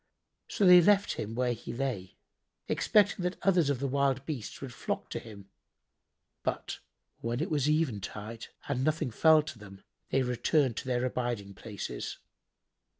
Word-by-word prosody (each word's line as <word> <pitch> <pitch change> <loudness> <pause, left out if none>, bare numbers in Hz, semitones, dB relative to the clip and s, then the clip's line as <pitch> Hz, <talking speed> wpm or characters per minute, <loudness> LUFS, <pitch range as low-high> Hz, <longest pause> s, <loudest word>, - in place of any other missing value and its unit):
So 200 - +1
they 180 -1 +9
left 205 +3 +4
him 110 +2 -5
where 125 0 +1
he 115 0 -7
lay, 115 -7 -3 0.5
expecting 205 -3 +3
that 180 +1 -2
others 175 -6 +3
of 140 - +1
the 140 - -1
wild 135 0 +1
beasts 135 -9 -5
would 135 -3 -7
flock - - -4
to - - -2
him; 100 -3 -12 0.9
but, - - -3 0.4
when 120 +1 -2
it - - -2
was 150 -1 +2
eventide 115 - -2 0.2
and 130 -2 -1
nothing 155 -4 0
fell 155 +6 +5
to 130 -6 -8
them, 100 -2 -13 0.3
they 135 - +2
returned 125 +1 +1
to - - -5
their 125 0 +1
abiding 120 -6 -2
places. 105 0 -6
130 Hz, 155 wpm, -30 LUFS, 115-155 Hz, 0.9 s, they